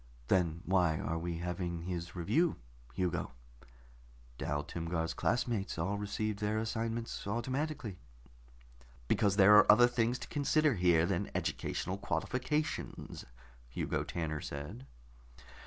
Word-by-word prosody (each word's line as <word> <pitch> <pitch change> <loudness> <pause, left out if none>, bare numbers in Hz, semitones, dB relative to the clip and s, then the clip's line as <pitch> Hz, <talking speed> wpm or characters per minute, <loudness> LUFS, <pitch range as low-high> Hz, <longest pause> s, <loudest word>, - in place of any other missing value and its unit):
"Then 85 -3 +2
why 90 -3 +3
are 80 +4 -2
we 85 0 -3
having 85 0 -3
his 85 -1 -4
review, 125 - +2 0.4
Hugo? 90 -6 -1 1.1
Dal 75 0 -1
Timgar's 80 +1 -2
classmates 115 -7 0
all 95 +5 -1
received 105 0 -2
their 105 0 0
assignments 115 0 -3
automatically." 130 - -2 1.1
"Because 100 -2 +3
there 100 +1 +8
are 105 - +8
other 120 +3 +7
things 120 0 +1
to - - -8
consider 150 0 +2
here 90 -4 +4
than 90 -1 -1
educational 95 +1 -2
qualifications," 130 +8 -2 0.4
Hugo - - -2
Tanner 80 -3 -3
said. 70 -2 -7
95 Hz, 115 wpm, -33 LUFS, 85-115 Hz, 1.1 s, there